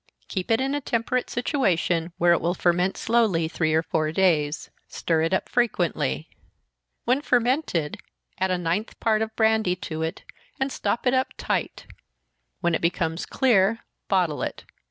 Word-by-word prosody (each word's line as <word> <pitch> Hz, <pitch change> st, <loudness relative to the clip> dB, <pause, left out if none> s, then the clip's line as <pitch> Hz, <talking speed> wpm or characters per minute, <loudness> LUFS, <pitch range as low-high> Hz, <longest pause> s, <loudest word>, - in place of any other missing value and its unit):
Keep 185 Hz, -1 st, -4 dB
it 225 Hz, 0 st, +3 dB
in 270 Hz, +1 st, 0 dB
a 290 Hz, -, -1 dB
temperate 245 Hz, 0 st, -1 dB
situation, 180 Hz, -, 0 dB
where 175 Hz, 0 st, +5 dB
it 170 Hz, -, +1 dB
will 175 Hz, +2 st, 0 dB
ferment 180 Hz, +2 st, +1 dB
slowly, 220 Hz, -8 st, +2 dB
three 160 Hz, -1 st, 0 dB
or 160 Hz, -, +2 dB
four 155 Hz, -2 st, -1 dB
days 160 Hz, -4 st, +1 dB, 0.2 s
stir 165 Hz, -2 st, 0 dB
it 165 Hz, +2 st, 0 dB
up 190 Hz, -, 0 dB
frequently. 180 Hz, -, 0 dB, 0.8 s
When 255 Hz, +4 st, +2 dB
fermented, 245 Hz, -, 0 dB, 0.4 s
add 190 Hz, 0 st, +1 dB
a 185 Hz, -, +1 dB
ninth 175 Hz, +5 st, -2 dB
part 220 Hz, -1 st, +2 dB
of 220 Hz, 0 st, -3 dB
brandy 220 Hz, -4 st, +2 dB
to 160 Hz, -3 st, -6 dB
it, 160 Hz, 0 st, -3 dB, 0.4 s
and 265 Hz, +1 st, 0 dB
stop 215 Hz, +2 st, -2 dB
it 250 Hz, -, +3 dB
up 260 Hz, 0 st, +1 dB
tight -, -, -2 dB, 0.8 s
when 175 Hz, 0 st, +1 dB
it -, -, 0 dB
becomes 165 Hz, -1 st, -1 dB
clear, 225 Hz, -4 st, +2 dB, 0.2 s
bottle 180 Hz, -6 st, +1 dB
it. -, -, -4 dB
190 Hz, 160 wpm, -25 LUFS, 165-235 Hz, 0.8 s, where